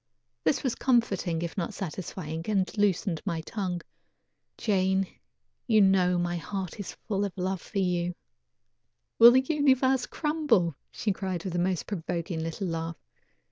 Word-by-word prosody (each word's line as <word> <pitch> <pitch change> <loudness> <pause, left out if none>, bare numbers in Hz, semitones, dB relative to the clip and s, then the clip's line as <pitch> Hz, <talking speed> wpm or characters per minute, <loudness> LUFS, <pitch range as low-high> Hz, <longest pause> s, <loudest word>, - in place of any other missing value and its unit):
This 160 - +1
was 260 -4 +1
comforting, 195 -9 +1
if 170 - -4
not 175 -4 -3
satisfying, 165 -2 -5
and 195 -3 0
loosened 195 -5 +1
my 170 -5 -2
tongue: 180 -1 -3 0.8
"Jane, 190 -2 +2 0.6
you 220 -3 +5
know 190 -2 +4
my 175 0 -1
heart 190 +1 -5
is 200 - -5
full 200 -2 0
of 200 -2 -4
love 185 0 -1
for 210 - -7
you 180 -2 0 0.5
" - - -53
"Will 230 +1 +12
the 255 +2 +5
universe 265 -4 +3
crumble?" 295 - +1 0.2
she 210 - -1
cried 185 -3 -3
with 185 - -4
the 175 - 0
most 180 -1 0
provoking 170 -2 -3
little 165 +4 -3
laugh. 165 -1 -3
190 Hz, 150 wpm, -28 LUFS, 175-210 Hz, 0.8 s, Will